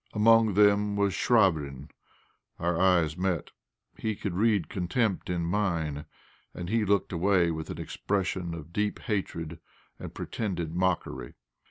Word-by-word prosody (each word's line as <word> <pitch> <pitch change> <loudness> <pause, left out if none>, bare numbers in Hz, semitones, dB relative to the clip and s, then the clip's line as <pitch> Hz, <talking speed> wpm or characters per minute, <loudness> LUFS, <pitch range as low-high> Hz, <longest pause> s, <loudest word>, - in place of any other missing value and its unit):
Among 110 -1 +5
them 105 0 +4
was 100 -1 +1
Chvabrine. 85 - +1 0.7
Our 85 0 0
eyes 85 -4 +3
met; 90 -2 -1 0.5
he 110 -1 -1
could 100 -2 -4
read 100 -3 +2
contempt 95 +4 -1
in 85 -1 -1
mine, 85 -6 -1 0.5
and 85 0 -5
he 115 +1 +2
looked 100 -1 +1
away 90 -1 +3
with 80 -1 -5
an - - -5
expression 95 -3 -2
of 85 +1 -10
deep 105 +1 0
hatred 85 -6 -3 0.4
and - - -7
pretended 85 -7 -4
mockery. 90 -8 -1
95 Hz, 135 wpm, -28 LUFS, 85-105 Hz, 0.7 s, Among